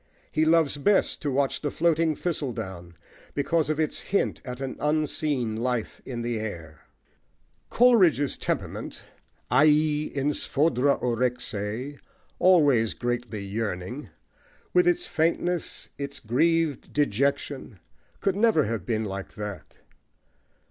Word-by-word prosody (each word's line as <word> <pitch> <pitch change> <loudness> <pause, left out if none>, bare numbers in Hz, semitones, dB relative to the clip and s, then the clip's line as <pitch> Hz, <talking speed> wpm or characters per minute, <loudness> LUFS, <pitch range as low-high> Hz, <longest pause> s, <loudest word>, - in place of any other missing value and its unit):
He 155 - +2
loves 160 -3 +3
best 195 +8 +2
to 150 - -1
watch 140 0 0
the 150 - -1
floating 165 0 +2
thistledown, 95 - -4 0.4
because 155 +2 +1
of 155 0 0
its 155 -2 0
hint 200 - -1
at 125 -1 -6
an 135 -1 -4
unseen 150 -5 0
life 120 0 -2
in 120 -3 -5
the 120 -1 -2
air. 85 -8 -7 0.9
Coleridge's 190 - +4
temperament, - - -4 0.5
aei 150 0 +3
en 140 +2 +1
sphodra 140 -2 +2
orexei,+ 125 +1 -2 2.7
with 360 0 +4
its 355 0 +2
faintness, 170 - -1
its 140 0 -3
grieved 155 +5 +1
dejection, 140 -2 0 0.4
could 195 -1 +1
never 210 -7 +4
have 110 -6 -3
been 110 -2 0
like 100 -1 -6
that. 105 -3 -7
140 Hz, 105 wpm, -26 LUFS, 120-160 Hz, 2.7 s, Coleridge's